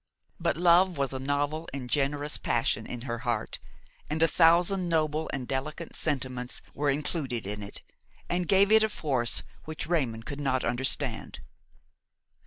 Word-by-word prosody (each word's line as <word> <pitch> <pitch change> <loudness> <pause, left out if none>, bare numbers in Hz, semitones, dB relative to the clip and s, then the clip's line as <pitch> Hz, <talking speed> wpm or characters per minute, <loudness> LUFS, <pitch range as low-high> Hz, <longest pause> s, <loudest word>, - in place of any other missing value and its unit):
But - - 0
love 175 0 +5
was 135 -1 -1
a 130 - -3
novel 145 +4 -1
and 130 -3 -5
generous 145 +2 0
passion - - 0
in 125 - -6
her 120 -1 -4
heart, 120 -3 -2 0.5
and 155 +2 +1
a - - +6
thousand 175 +3 +4
noble 155 -1 0
and 130 -3 -4
delicate 155 +5 -4
sentiments 130 -4 -2
were 145 0 0
included 140 - -2
in 105 +1 -3
it 100 - -9 0.4
and 175 0 -1
gave 200 +1 +4
it 220 0 +7
a 220 - +3
force 130 - +1 0.2
which 155 -1 -4
Raymon 130 -9 -1
could 145 +3 -6
not 130 -2 0
understand. 120 +2 0
145 Hz, 155 wpm, -28 LUFS, 130-165 Hz, 0.5 s, it